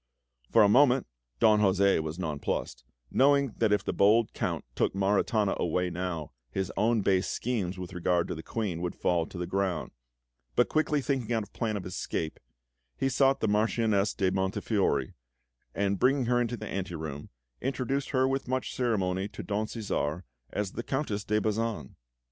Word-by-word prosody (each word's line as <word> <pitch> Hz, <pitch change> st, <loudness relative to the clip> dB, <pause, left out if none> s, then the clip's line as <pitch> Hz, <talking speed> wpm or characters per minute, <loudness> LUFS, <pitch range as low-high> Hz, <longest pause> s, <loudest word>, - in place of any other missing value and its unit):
For 115 Hz, -, +6 dB
a -, -, +6 dB
moment 130 Hz, +4 st, +5 dB, 0.3 s
Don 105 Hz, -1 st, +5 dB
José 95 Hz, -2 st, +4 dB
was 80 Hz, +1 st, -5 dB
nonplussed, 75 Hz, -7 st, -3 dB, 0.3 s
knowing 140 Hz, -2 st, +4 dB
that 110 Hz, -2 st, +3 dB
if 105 Hz, -, +2 dB
the -, -, -1 dB
bold 105 Hz, +3 st, +4 dB
Count -, -, -2 dB
took -, -, 0 dB
Maritana 100 Hz, +1 st, +2 dB
away 90 Hz, +1 st, 0 dB
now, 85 Hz, -4 st, -4 dB, 0.2 s
his 95 Hz, +8 st, -2 dB
own 110 Hz, +2 st, +2 dB
base 95 Hz, -1 st, +2 dB
schemes 100 Hz, -7 st, -2 dB
with 90 Hz, 0 st, -7 dB
regard 90 Hz, -1 st, +1 dB
to -, -, -3 dB
the 80 Hz, -, -6 dB
Queen 95 Hz, -4 st, -3 dB
would 90 Hz, -1 st, -3 dB
fall 85 Hz, -2 st, +1 dB
to -, -, -10 dB
the 90 Hz, -, -2 dB
ground; 95 Hz, -3 st, -1 dB, 0.6 s
but -, -, +3 dB
quickly 155 Hz, -2 st, +1 dB
thinking 130 Hz, -4 st, -1 dB
out 110 Hz, -, 0 dB
a -, -, -35 dB
plan 110 Hz, -2 st, -2 dB
of 95 Hz, -, -6 dB
escape, 80 Hz, -3 st, -3 dB, 0.6 s
he 135 Hz, -, +1 dB
sought 135 Hz, +1 st, +3 dB
the 110 Hz, -, +2 dB
Marchioness 105 Hz, -1 st, +2 dB
de 95 Hz, -1 st, +1 dB
Montefiori, 95 Hz, -, 0 dB, 0.6 s
and 100 Hz, -1 st, 0 dB
bringing 135 Hz, 0 st, +3 dB
her 120 Hz, +1 st, +2 dB
into 120 Hz, 0 st, -2 dB
the 110 Hz, -, -6 dB
ante 95 Hz, -2 st, -4 dB
room, 75 Hz, -3 st, -6 dB, 0.3 s
introduced 135 Hz, +1 st, -1 dB
her 130 Hz, -1 st, +2 dB
with 135 Hz, -1 st, -1 dB
much 130 Hz, 0 st, -2 dB
ceremony 95 Hz, -6 st, 0 dB
to 105 Hz, -, -8 dB
Don 105 Hz, +1 st, -1 dB
Cæsar 95 Hz, -7 st, -2 dB, 0.3 s
as 100 Hz, +4 st, -2 dB
the -, -, -4 dB
Countess 120 Hz, -6 st, -2 dB
de 105 Hz, 0 st, +1 dB
Bazan. 110 Hz, -, -2 dB
105 Hz, 175 wpm, -29 LUFS, 90-120 Hz, 0.6 s, For